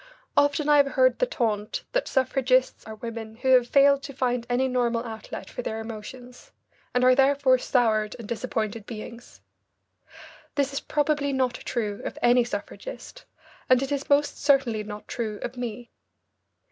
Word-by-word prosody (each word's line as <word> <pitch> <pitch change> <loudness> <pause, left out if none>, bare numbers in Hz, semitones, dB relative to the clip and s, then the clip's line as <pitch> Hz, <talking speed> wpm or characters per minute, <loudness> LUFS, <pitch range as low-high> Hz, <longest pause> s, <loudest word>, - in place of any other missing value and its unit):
Often 285 +1 +2
I 295 0 +6
have 280 -1 +3
heard 255 -1 +3
the - - +2
taunt 215 - -2
that - - 0
suffragists 260 -1 +1
are 220 - -7
women 225 0 -7
who 260 +3 -2
have 250 -2 +5
failed 280 0 +5
to 280 0 -8
find 245 -2 -1
any 250 +2 +2
normal 240 -2 0
outlet 220 -2 -7
for - - -6
their 220 -2 -4
emotions, 245 - -9 0.4
and 250 - +1
are 255 0 +7
therefore 270 -1 +4
soured 220 -5 +1
and 230 -3 -9
disappointed 220 -2 -3
beings. 230 +1 -9 1.1
This 280 -1 0
is 275 - -1
probably 295 -1 0
not 260 -2 +1
true 210 -5 -4
of - - -5
any 245 0 +5
suffragist, 375 - -7 0.4
and 255 +1 +5
it 270 - -4
is 285 0 -2
most 290 +1 +2
certainly 270 -7 +2
not 210 0 -9
true 220 -4 -4
of 245 - -5
me. 240 -1 -6
250 Hz, 160 wpm, -26 LUFS, 230-275 Hz, 1.1 s, are